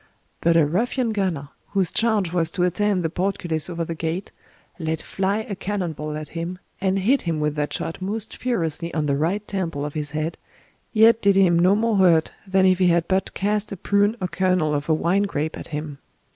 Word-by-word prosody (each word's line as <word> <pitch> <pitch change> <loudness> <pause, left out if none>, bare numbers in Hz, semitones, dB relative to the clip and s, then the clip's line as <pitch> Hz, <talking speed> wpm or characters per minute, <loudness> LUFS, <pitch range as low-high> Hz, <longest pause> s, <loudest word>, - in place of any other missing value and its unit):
But 170 0 +3
a 160 - +5
ruffian 230 - 0
gunner, 180 -9 -2 0.2
whose 190 -4 +1
charge 215 -7 +1
was 165 -3 +1
to 175 +2 -1
attend 185 +1 +1
the 165 - 0
portcullis 180 -4 -1
over 170 -1 -3
the 165 - -4
gate, 165 +4 -3 0.5
let 160 -1 -2
fly 200 +3 -1
a 200 - -4
cannon 190 -3 -3
ball 150 0 -5
at 155 0 -7
him, 170 +2 -4 0.2
and 190 0 +1
hit 240 +9 +2
him 165 -3 -2
with 150 -1 0
that 150 0 -1
shot 165 - -4
most 210 +3 -3
furiously 170 -9 -2
on 155 -2 0
the 140 -1 +1
right 180 +8 -1
temple 165 -8 -2
of 145 - -5
his 150 -2 -3
head, 155 +2 -3 0.5
yet 225 +1 +5
did 200 -1 +4
him 180 -3 +4
no 185 +3 +5
more 225 0 +1
hurt 170 -4 +4 0.2
than 190 0 +3
if 185 0 +4
he 185 - +4
had 170 -1 +2
but 190 0 0
cast 210 +1 -1
a 195 - -5
prune 205 +4 +2
or 185 - -1
kernel 180 -3 +1
of 145 +2 -2
a - - +5
wine 175 +5 +2
grape 155 -2 -2
at - - -8
him. 150 -2 -5
180 Hz, 215 wpm, -23 LUFS, 160-200 Hz, 0.5 s, a